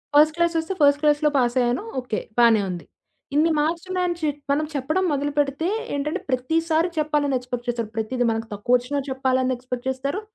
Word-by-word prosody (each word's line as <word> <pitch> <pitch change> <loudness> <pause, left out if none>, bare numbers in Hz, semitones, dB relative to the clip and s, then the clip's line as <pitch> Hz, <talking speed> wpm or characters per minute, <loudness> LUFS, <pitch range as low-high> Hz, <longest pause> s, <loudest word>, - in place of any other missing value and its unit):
First 305 +1 +6
క్లాసొస్తే, 340 +1 0
first 285 +1 +5
క్లాస్‌లో 300 0 +3
పాసయ్యాను. 245 - +1 0.2
Okay. 235 -3 -3 0.2
బానే 230 -3 +6
ఉంది. 175 -1 -6 0.5
ఇన్ని 320 +2 +4
మార్క్సున్నాయని 345 +3 -1
చె 310 -2 0 0.2
మనం 305 +2 +1
చెప్పడం 310 +7 0
మొదలు 290 +1 -1
పెడితే 290 +3 +1 0.3
ఏంటంటే, 295 +2 -2
ప్రతిసారి 320 +6 +1
చెప్పాలని 295 -2 +1
ఎక్స్‌పెక్ట్ 245 0 -6
చేస్తారు. 230 -3 -2
ప్రతీది 245 +3 -1
మనకు 225 0 -3
తక్కువొచ్చినా 250 +6 +1
చెప్పాలని 260 -1 +1
ఎక్స్‌పెక్ట్ 250 0 -6
చేస్తారు. 275 +10 -2
280 Hz, 150 wpm, -23 LUFS, 250-310 Hz, 0.5 s, First